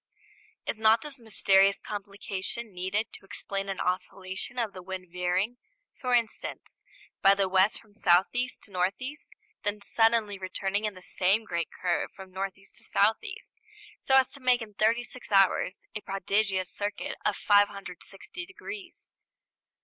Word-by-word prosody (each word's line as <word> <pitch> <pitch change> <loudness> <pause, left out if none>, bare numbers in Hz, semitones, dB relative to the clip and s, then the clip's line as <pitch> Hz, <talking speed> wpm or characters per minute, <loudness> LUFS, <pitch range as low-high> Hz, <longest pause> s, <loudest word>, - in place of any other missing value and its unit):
Is 220 - -2
not 220 +1 +5
this 295 -3 -6
mysterious 195 -3 +4
complication 205 +1 -4
needed 190 +5 -2
to - - -10
explain 195 0 -4
an 195 - -3
oscillation 190 +5 -2
of 225 -4 -1
the 185 - -8
wind 185 -1 -7
veering, 180 +6 0 0.4
for 250 -1 +1
instance, 230 -2 -2 0.4
by 195 0 +7
the 195 -1 +2
west 190 +2 +3
from 215 -3 -22
south 180 -3 +5
east 250 +1 -2
to 205 - -9
north 185 +1 0
east, 280 +4 -7 0.3
then 205 0 -1
suddenly 225 -1 +2
returning 195 +2 -1
in 210 -2 -2
the 185 - -10
same 195 +4 +2
great 170 -4 -2
curve 175 -1 -1
from 190 -1 -11
north 190 0 -3
east 195 0 -11
to - - -8
south 215 +2 +3
east, - - -7 0.5
so 265 - +3
as 265 -1 +4
to 280 - -11
make 250 -2 +3
in 210 -2 -11
thirty 225 +4 +2
six 245 -1 -7
hours 195 -1 +4
a 210 - -4
prodigious 195 -1 0
circuit 205 0 -3
of 210 - +2
560 200 - 0
degrees? 395 -1 -9
200 Hz, 160 wpm, -29 LUFS, 190-225 Hz, 0.5 s, by